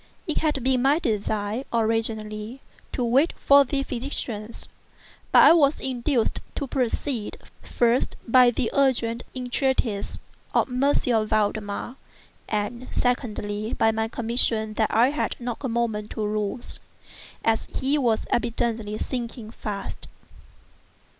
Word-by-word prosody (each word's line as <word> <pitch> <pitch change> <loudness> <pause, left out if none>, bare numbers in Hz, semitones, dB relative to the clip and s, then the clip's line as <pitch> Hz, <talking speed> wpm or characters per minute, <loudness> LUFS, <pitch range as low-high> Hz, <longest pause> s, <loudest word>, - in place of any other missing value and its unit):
It 315 - -1
had 300 -5 0
been 260 -1 +2
my 275 +4 +4
design, 215 -3 -1
originally, 225 0 -1 0.3
to 250 - -1
wait 270 +8 +3
for 280 0 +6
the 275 +1 -1
physicians; 235 -4 -5 0.6
but - - +8
I - - +9
was 295 -3 +4
induced 250 -1 0 0.2
to 280 - -2
proceed, 250 -2 -2 0.2
first, 240 +1 +1
by 250 +1 +7
the 235 -1 -1
urgent 240 -4 +2
entreaties 250 -4 -1 0.4
of - - +3
M. 250 -4 +2
Valdemar, 215 +3 -1 0.5
and 220 +4 -2
secondly, 215 -3 -1
by 225 - +3
my 220 0 -1
conviction 225 -2 0
that 215 0 +1
I 240 +5 +4
had 300 - -1
not 240 -1 -4
a 265 - -2
moment 225 -3 -1
to 215 - -1
lose, 210 +2 -3 0.7
as 225 -1 +2
he 280 +3 0
was 230 -5 +2
evidently 230 -2 -1
sinking 235 -3 -4
fast. 205 -3 -6
235 Hz, 125 wpm, -25 LUFS, 220-260 Hz, 0.7 s, I